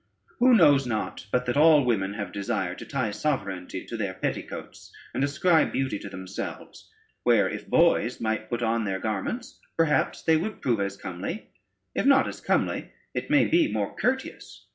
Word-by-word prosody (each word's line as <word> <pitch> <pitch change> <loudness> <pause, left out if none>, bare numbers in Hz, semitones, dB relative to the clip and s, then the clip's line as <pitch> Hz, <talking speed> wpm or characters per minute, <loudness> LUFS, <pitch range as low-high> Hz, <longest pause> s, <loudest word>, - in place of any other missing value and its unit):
Who 250 0 +6
knows 145 - +5
not, 110 -3 -3
but 125 0 +1
that 125 +2 -1
all 150 -2 +6
women 100 -5 0
have 100 -1 -5
desire 95 -3 -2
to - - -9
tie 130 -6 -1
sovereignty 100 -8 -3
to - - -6
their 100 -4 -3
petticoats, 95 - -5 0.2
and 135 - 0
ascribe 155 +3 +3
beauty 135 -6 -1
to 100 - -8
themselves, 95 0 -7 0.3
where, - - +4
if - - -6
boys 120 +3 +3
might 110 -1 -2
put 120 -1 -2
on 115 0 +1
their 95 -2 -1
garments, 110 - -4 0.2
perhaps 165 -2 +1
they 160 -1 +4
would 215 +7 -4
prove 120 -4 0
as 100 0 -2
comely; 95 - -6 0.4
if - - 0
not 275 -1 +5
as - - -7
comely, - - 0 0.2
it - - -4
may 295 - +5
be 325 -1 +3
more - - -2
courteous. - - -3
120 Hz, 175 wpm, -26 LUFS, 100-155 Hz, 0.4 s, Who